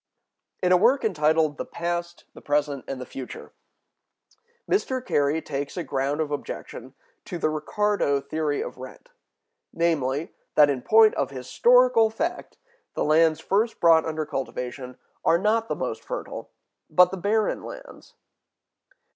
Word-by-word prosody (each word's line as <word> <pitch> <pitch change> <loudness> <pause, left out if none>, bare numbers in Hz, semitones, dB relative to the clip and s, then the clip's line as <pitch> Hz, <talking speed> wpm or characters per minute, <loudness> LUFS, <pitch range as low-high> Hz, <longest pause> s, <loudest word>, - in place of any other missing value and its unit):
In 180 - +3
a 180 - +7
work 240 +6 +3
entitled 155 -5 +2
"The - - -1
Past, 175 0 -4
the - - -13
Present, 145 -2 -1
and 135 - -5
the 125 - -6
Future," 130 0 -9 1.1
Mr. 265 -10 0
Carey 145 +3 +1
takes 140 +3 -5
[a] 175 - -2
ground 140 +2 -1
of 150 -2 -3
objection 145 - -7 0.3
to 175 - -5
the 155 -2 0
Ricardo 155 -1 0
theory 145 +1 -2
of - - -9
rent, 130 0 -11 0.6
namely, 155 -3 -1 0.2
that 145 -1 +6
in 130 -3 -3
point 220 - +5
of - - -1
historical 230 - +3
fact 335 +11 -4 0.4
the - - 0
lands 160 +1 +3
first 215 +7 0
brought 165 -1 +5
under 155 -1 -2
cultivation 125 -2 -5 0.3
are 165 - +4
not 220 +4 +1
the - - -2
most - - -4
fertile, - - -6 0.4
but 180 0 +5
the 190 - -4
barren 210 +4 0
lands. - - -11
160 Hz, 145 wpm, -25 LUFS, 145-210 Hz, 1.1 s, a